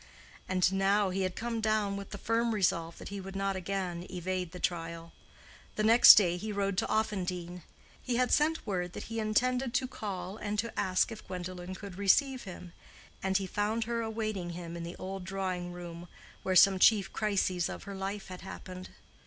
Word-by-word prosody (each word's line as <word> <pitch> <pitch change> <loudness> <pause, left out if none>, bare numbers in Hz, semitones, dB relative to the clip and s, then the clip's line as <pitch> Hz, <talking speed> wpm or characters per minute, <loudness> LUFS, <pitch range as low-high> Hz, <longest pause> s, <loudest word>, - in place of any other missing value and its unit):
And 185 0 +2
now 195 0 +2
he 190 +1 -1
had 185 -1 -1
come 230 -1 -3
down 215 -2 +1
with 200 -1 -6
the 205 - -6
firm 230 +2 0
resolve 170 -4 0
that - - -8
he 200 -1 -5
would 195 +1 -8
not 195 0 0
again 185 -2 -3
evade 180 -1 -3
the 180 - -8
trial. 165 -1 -3 0.6
The 215 - 0
next 230 +3 +10
day 175 -4 +3
he 215 +4 -4
rode 200 -1 -1
to - - -1
Offendene. 180 -5 -2 0.4
He 250 - -2
had 250 +1 +2
sent 315 +2 +2
word 180 -4 -2
that - - -6
he 225 - -1
intended 250 +3 +1
to 255 0 +2
call 195 -5 -5
and 210 -1 -3
to 230 +2 -2
ask 185 +4 +1
if 220 - -9
Gwendolen 180 0 -6
could 195 -1 -9
receive 260 +6 +3
him; 180 -2 -9 0.5
and 190 0 +2
he 195 - -2
found 210 +4 -1
her 230 +1 -2
awaiting 215 -5 -3
him 170 -1 -7
in 170 - -5
the 170 +1 -6
old 190 0 -6
drawing 185 -2 -3
room 175 -1 -8 0.3
where 185 - -1
some 190 +1 +7
chief 200 -3 +5
crises 190 -5 0
of - - -7
her 200 - -7
life 195 +1 -4
had 185 -1 -8
happened. 185 -1 -8
195 Hz, 195 wpm, -31 LUFS, 180-215 Hz, 0.6 s, next